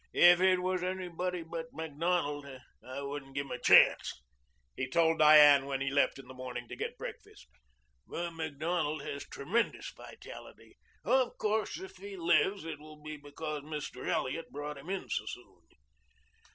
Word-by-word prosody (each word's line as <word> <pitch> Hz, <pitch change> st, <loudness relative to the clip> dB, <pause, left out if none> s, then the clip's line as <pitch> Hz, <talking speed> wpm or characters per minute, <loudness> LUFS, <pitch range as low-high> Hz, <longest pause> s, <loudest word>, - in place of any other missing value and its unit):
If 175 Hz, 0 st, +7 dB
it 185 Hz, -1 st, +4 dB
was 185 Hz, 0 st, 0 dB
anybody 180 Hz, -1 st, -3 dB
but 165 Hz, 0 st, -6 dB
Macdonald, 160 Hz, -1 st, -1 dB, 0.4 s
I 130 Hz, +2 st, -6 dB
wouldn't 140 Hz, -1 st, -6 dB
give 140 Hz, 0 st, -1 dB
him -, -, -11 dB
a 125 Hz, -, -4 dB
chance," -, -, +5 dB, 0.6 s
he 130 Hz, 0 st, -3 dB
told 165 Hz, +3 st, +3 dB
Diane 150 Hz, -2 st, +8 dB
when 135 Hz, -1 st, -2 dB
he 135 Hz, 0 st, -1 dB
left 140 Hz, 0 st, +2 dB
in 135 Hz, -2 st, -12 dB
the 130 Hz, -, -10 dB
morning 130 Hz, -1 st, -6 dB
to -, -, -6 dB
get -, -, -4 dB
breakfast. 65 Hz, -, -9 dB, 0.6 s
"But 170 Hz, 0 st, -4 dB
Macdonald 160 Hz, -1 st, -2 dB
has 140 Hz, -, -6 dB
tremendous 210 Hz, +12 st, -1 dB
vitality. -, -, -12 dB, 0.3 s
Of 260 Hz, -2 st, +2 dB
course 215 Hz, 0 st, -1 dB
if 190 Hz, -, -10 dB
he 195 Hz, +1 st, -8 dB
lives 175 Hz, +2 st, +2 dB
it 160 Hz, -3 st, -5 dB
will 155 Hz, 0 st, -13 dB
be 155 Hz, +1 st, -7 dB
because 150 Hz, +1 st, -6 dB
Mr. 150 Hz, -3 st, -6 dB
Elliot 140 Hz, +6 st, -1 dB
brought 145 Hz, 0 st, -6 dB
him 150 Hz, +6 st, -11 dB
in 195 Hz, -1 st, -3 dB
so -, -, -2 dB
soon." -, -, -9 dB
155 Hz, 165 wpm, -32 LUFS, 140-175 Hz, 0.6 s, Diane